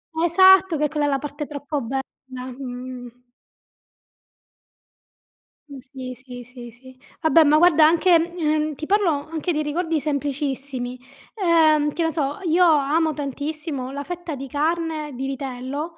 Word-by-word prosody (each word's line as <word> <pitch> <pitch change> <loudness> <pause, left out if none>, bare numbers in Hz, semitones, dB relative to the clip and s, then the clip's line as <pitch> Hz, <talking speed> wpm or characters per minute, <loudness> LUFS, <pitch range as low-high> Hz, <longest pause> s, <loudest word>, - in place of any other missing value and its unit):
Esatto! 375 +1 +5
Che 300 0 +1
quella 300 -1 -1
è - - +1
la 275 -1 0
parte 295 +1 -6
troppo 290 0 -4
bella, 265 +3 -2 0.6
mhmm. 250 -1 -8 2.5
Mh, 280 - -9
sì, 255 -2 -7
sì, 250 -1 -11
sì, 240 -1 -11
sì. 260 +2 -16 0.2
Vabbè 320 0 +5
ma 300 +1 +4
guarda 320 -2 +6
anche 340 +3 +4 0.2
ehm, 305 -2 0
ti 305 - -6
parlo 405 -1 +2 0.2
anche 330 +2 -2
di 305 - 0
ricordi 320 +1 -1
semplicissimi, 275 -3 -3 0.4
ehm, 315 -6 +3
che 335 - -1
ne 325 - 0
so, 290 -2 -2
io 345 +2 +3
amo 310 +1 +2
tantissimo 285 -1 -4
la 285 +1 -5
fetta 345 -1 -6
di 275 +1 -7
carne 310 0 -2
di 265 +2 -4
vitello, 275 +4 -5
295 Hz, 145 wpm, -22 LUFS, 270-325 Hz, 2.5 s, guarda